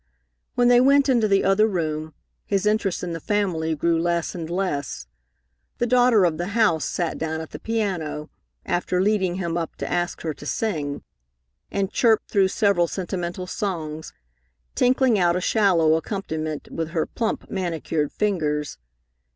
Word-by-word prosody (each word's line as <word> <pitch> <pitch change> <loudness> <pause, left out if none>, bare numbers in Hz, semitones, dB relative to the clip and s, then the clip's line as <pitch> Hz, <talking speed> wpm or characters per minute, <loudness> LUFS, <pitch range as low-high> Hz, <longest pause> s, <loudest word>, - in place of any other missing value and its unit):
When 245 0 +4
they 245 0 +6
went 280 +1 +4
into 235 -4 +3
the 195 -1 +3
other 195 +3 +4
room, 155 -5 -3 0.3
his 200 0 0
interest 210 -4 +1
in 175 -1 -3
the 165 - -4
family 165 -5 0
grew 165 +2 +1
less 170 -1 0
and 165 -3 -6
less. 170 - -2 0.7
The 240 - +1
daughter 245 -4 +4
of 160 -2 0
the 175 - -2
house 165 -10 +3
sat 170 -3 -2
down 160 0 -2
at 160 - -8
the - - -7
piano, 180 -9 -2 0.3
after 180 +1 0
leading 190 -2 +1
him 170 -2 -2
up 165 - -5
to - - -5
ask 175 0 -2
her 160 -2 -2
to 145 - -12
sing, 150 -11 -2 0.7
and 200 0 -1
chirped 225 -3 +2
through 195 -2 +4
several 190 -3 +2
sentimental 180 0 -4
songs, 160 -6 -4 0.6
tinkling 250 -3 +3
out 175 -1 +3
a - - +1
shallow 180 -6 +3
accompaniment 160 -4 -3
with 165 -1 -3
her 160 - +2
plump, 225 -2 -3
manicured 165 -5 -2
fingers. 150 - -1
180 Hz, 160 wpm, -23 LUFS, 160-210 Hz, 0.7 s, they